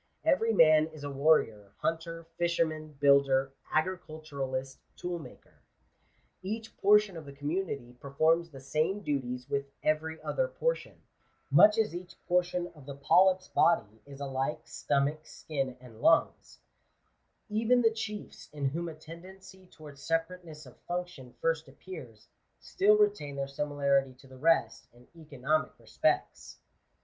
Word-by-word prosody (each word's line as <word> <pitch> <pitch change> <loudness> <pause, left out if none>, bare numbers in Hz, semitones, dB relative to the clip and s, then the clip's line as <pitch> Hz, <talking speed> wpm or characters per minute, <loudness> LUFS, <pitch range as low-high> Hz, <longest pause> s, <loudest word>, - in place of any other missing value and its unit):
Every 230 -7 +3
man 155 -5 +6
is 155 -2 -12
a 145 - -4
warrior, 125 -9 +2
hunter, 165 0 -3
fisherman, 160 -3 -1
builder, 140 -1 +4 0.2
agriculturist, 155 -6 -3 0.2
toolmaker. 175 -3 -8 0.8
Each 220 +4 -5
portion 210 -1 +4
of 160 -2 -8
the - - -8
community 145 -3 -4
per 140 - -9
forms 165 +4 +2
the 135 -4 -12
same 155 +9 -1
duties 125 -4 -3
with 140 0 -2 0.2
every 160 +1 0
other - - 0
portion; - - -3 0.5
much 210 +1 +7
as 220 -4 +1
each 175 +1 -8
portion 180 0 0
of 145 -4 -16
the 140 - -6
polyp's 185 +6 +3
body 110 -10 +2
is 140 -1 -11
alike 135 0 -3
stomach, 145 +2 0
skin, 135 -4 -4
and 120 -3 -14
lungs* - - +2 0.9
Even 230 +3 +2
the 225 - +5
chiefs, 215 -2 -7
in 145 -2 -1
whom 170 +4 -4
a 160 - -9
tendency 185 +4 -13
towards 150 -5 -13
separateness 165 -2 -3
of 125 - -16
function 175 -8 -5
first 165 -2 0
appears, 135 - -11 0.3
still 210 +2 +3
retain 205 -9 +1
their 140 0 -2
similarity 140 -2 0
to 130 - -19
the 130 -1 -14
rest 155 -7 +2
in 120 +1 -20
economic 155 -1 -2
respects. - - -1
155 Hz, 135 wpm, -30 LUFS, 140-180 Hz, 0.9 s, much